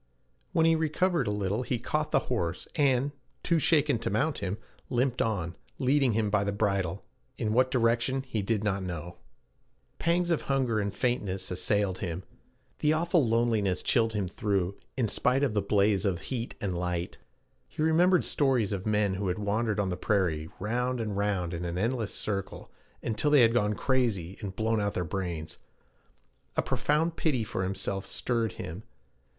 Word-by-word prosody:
When 160 Hz, -, +3 dB
he 165 Hz, 0 st, +5 dB
recovered 160 Hz, -, +1 dB
a -, -, +1 dB
little, 105 Hz, +2 st, -1 dB
he 125 Hz, 0 st, -1 dB
caught -, -, -2 dB
the -, -, +4 dB
horse, 85 Hz, -1 st, -2 dB
and, 140 Hz, -2 st, +2 dB, 0.3 s
too 170 Hz, -2 st, +2 dB
shaken 145 Hz, -5 st, +3 dB
to -, -, -2 dB
mount 140 Hz, +10 st, 0 dB
him, 100 Hz, 0 st, -2 dB, 0.3 s
limped 125 Hz, 0 st, +1 dB
on, 90 Hz, -7 st, -1 dB, 0.2 s
leading 135 Hz, -2 st, +3 dB
him 105 Hz, -1 st, +1 dB
by 105 Hz, -1 st, +3 dB
the 100 Hz, -, -1 dB
bridle, 100 Hz, -3 st, -1 dB, 0.3 s
in 110 Hz, -3 st, -1 dB
what 130 Hz, +2 st, +4 dB
direction 120 Hz, +2 st, +1 dB
he 115 Hz, -5 st, -2 dB
did 105 Hz, +1 st, 0 dB
not 100 Hz, -2 st, 0 dB
know. 85 Hz, -1 st, -5 dB, 0.8 s
Pangs 175 Hz, +1 st, +2 dB
of 165 Hz, -, +2 dB
hunger 130 Hz, -5 st, +1 dB
and 100 Hz, -1 st, -1 dB
faintness 95 Hz, -7 st, -1 dB
assailed 95 Hz, 0 st, 0 dB
him. 90 Hz, +1 st, -4 dB, 0.6 s
The 150 Hz, +1 st, +3 dB
awful 170 Hz, 0 st, +2 dB
loneliness 110 Hz, -5 st, +1 dB
chilled 115 Hz, -2 st, +2 dB
him 100 Hz, -3 st, -1 dB
through 100 Hz, -1 st, -1 dB, 0.2 s
in 120 Hz, -4 st, +2 dB
spite 125 Hz, +6 st, +2 dB
of 135 Hz, -6 st, +1 dB
the 105 Hz, -, +2 dB
blaze 100 Hz, -1 st, +2 dB
of 95 Hz, -5 st, 0 dB
heat 120 Hz, -2 st, -4 dB
and 100 Hz, -5 st, -2 dB
light. 90 Hz, 0 st, -3 dB, 0.5 s
He 155 Hz, -, -3 dB
remembered 175 Hz, +3 st, +4 dB
stories 125 Hz, -8 st, +1 dB
of 100 Hz, +1 st, -3 dB
men 105 Hz, -2 st, +2 dB
who 95 Hz, +1 st, -2 dB
had 90 Hz, -, -1 dB
wandered 105 Hz, +1 st, 0 dB
on 100 Hz, -2 st, +1 dB
the 90 Hz, -, -2 dB
prairie, 85 Hz, -7 st, 0 dB
round 125 Hz, +5 st, -1 dB
and 105 Hz, -3 st, -2 dB
round 100 Hz, -4 st, 0 dB
in 85 Hz, +1 st, -4 dB
an 85 Hz, 0 st, -3 dB
endless 115 Hz, +1 st, -1 dB
circle, 100 Hz, -3 st, -4 dB, 0.3 s
until 115 Hz, +6 st, 0 dB
they 145 Hz, -2 st, +6 dB
had 115 Hz, 0 st, +4 dB
gone 105 Hz, -3 st, +2 dB
crazy 110 Hz, -10 st, 0 dB
and 95 Hz, -2 st, -5 dB
blown 110 Hz, 0 st, +1 dB
out 100 Hz, 0 st, -1 dB
their 90 Hz, -, 0 dB
brains. 85 Hz, -2 st, -4 dB, 1.0 s
A -, -, +3 dB
profound 160 Hz, +3 st, +1 dB
pity 135 Hz, -8 st, +1 dB
for 105 Hz, -3 st, -3 dB
himself 95 Hz, +1 st, -3 dB
stirred 115 Hz, -3 st, -1 dB
him. 85 Hz, +6 st, -6 dB
105 Hz, 175 wpm, -29 LUFS, 95-130 Hz, 1.0 s, they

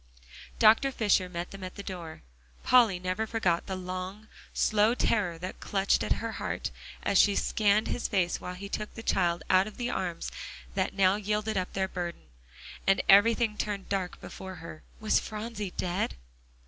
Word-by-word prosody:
Dr. 225 Hz, +5 st, +5 dB
Fisher 205 Hz, -6 st, +2 dB
met 175 Hz, 0 st, -5 dB
them 195 Hz, -1 st, -9 dB
at 185 Hz, -, -7 dB
the 200 Hz, -, -7 dB
door. 170 Hz, -5 st, -7 dB, 0.4 s
Polly 235 Hz, -7 st, +5 dB
never 185 Hz, +5 st, -2 dB
forgot 185 Hz, -7 st, 0 dB
the 190 Hz, -, -3 dB
long, 185 Hz, +3 st, -6 dB, 0.2 s
slow 215 Hz, +2 st, +3 dB
terror 195 Hz, -9 st, +1 dB
that 180 Hz, +3 st, -7 dB
clutched 195 Hz, -1 st, +1 dB
at -, -, +1 dB
her 230 Hz, 0 st, -4 dB
heart -, -, -3 dB, 0.3 s
as 195 Hz, -, +3 dB
she 200 Hz, -1 st, +5 dB
scanned 210 Hz, +1 st, +2 dB
his 245 Hz, -, -1 dB
face 185 Hz, -4 st, 0 dB
while 180 Hz, -, -5 dB
he 200 Hz, +2 st, -7 dB
took 210 Hz, +1 st, -4 dB
the 225 Hz, -, -7 dB
child 175 Hz, -5 st, +1 dB
out 190 Hz, +1 st, +4 dB
of 215 Hz, -, -10 dB
the 245 Hz, 0 st, -2 dB
arms 175 Hz, -3 st, -3 dB, 0.4 s
that 195 Hz, +1 st, -1 dB
now 195 Hz, 0 st, +4 dB
yielded 210 Hz, +1 st, -1 dB
up 185 Hz, -1 st, -2 dB
their 190 Hz, -1 st, 0 dB
burden. 175 Hz, -2 st, -5 dB, 0.6 s
And 195 Hz, -, +4 dB
everything 215 Hz, +2 st, +5 dB
turned 205 Hz, -2 st, -3 dB
dark 190 Hz, -3 st, -2 dB
before 190 Hz, 0 st, -8 dB
her 160 Hz, -2 st, -10 dB, 0.2 s
eyes -, -, -24 dB
Was 215 Hz, -, +3 dB
Phronsie 210 Hz, -3 st, -5 dB
dead? 180 Hz, +2 st, -1 dB
195 Hz, 175 wpm, -29 LUFS, 185-215 Hz, 0.6 s, Dr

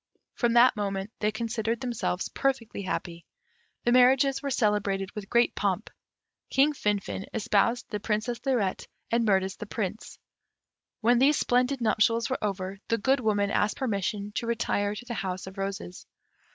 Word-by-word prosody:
From 240 Hz, -2 st, +1 dB
that 240 Hz, +1 st, +6 dB
moment 200 Hz, -1 st, -3 dB
they 210 Hz, 0 st, +1 dB
considered 225 Hz, 0 st, -2 dB
themselves 235 Hz, -7 st, -2 dB
perfectly 260 Hz, -7 st, -1 dB
happy. 175 Hz, -2 st, -4 dB, 0.6 s
The 240 Hz, -, +2 dB
marriages 260 Hz, +2 st, +5 dB
were 280 Hz, -, -2 dB
celebrated 205 Hz, -5 st, 0 dB
with 210 Hz, -2 st, -8 dB
great 235 Hz, 0 st, +3 dB
pomp. -, -, -1 dB, 0.6 s
King 280 Hz, +3 st, +3 dB
Finfin 205 Hz, -5 st, -2 dB
espoused 230 Hz, +2 st, +1 dB
the 210 Hz, -, -2 dB
Princess 220 Hz, +3 st, -2 dB
Lirette, 240 Hz, -9 st, 0 dB, 0.2 s
and 230 Hz, -1 st, +2 dB
Mirtis 190 Hz, -1 st, +1 dB
the 210 Hz, -, -7 dB
Prince. 215 Hz, 0 st, -4 dB, 0.8 s
When 240 Hz, +1 st, +4 dB
these 280 Hz, +3 st, +4 dB
splendid 250 Hz, +2 st, +1 dB
nuptials 230 Hz, +2 st, +2 dB
were 260 Hz, -, -2 dB
over, 195 Hz, -1 st, -3 dB
the 230 Hz, -, +1 dB
Good 265 Hz, +5 st, +2 dB
Woman 205 Hz, -3 st, +1 dB
asked 210 Hz, -, +1 dB
permission 205 Hz, -3 st, -2 dB
to 235 Hz, -, -2 dB
retire 210 Hz, -3 st, 0 dB
to 245 Hz, -, -8 dB
the 240 Hz, -, -5 dB
House 185 Hz, -4 st, -3 dB
of 190 Hz, +1 st, -9 dB
Roses. 195 Hz, -2 st, -5 dB
220 Hz, 155 wpm, -27 LUFS, 200-245 Hz, 0.8 s, that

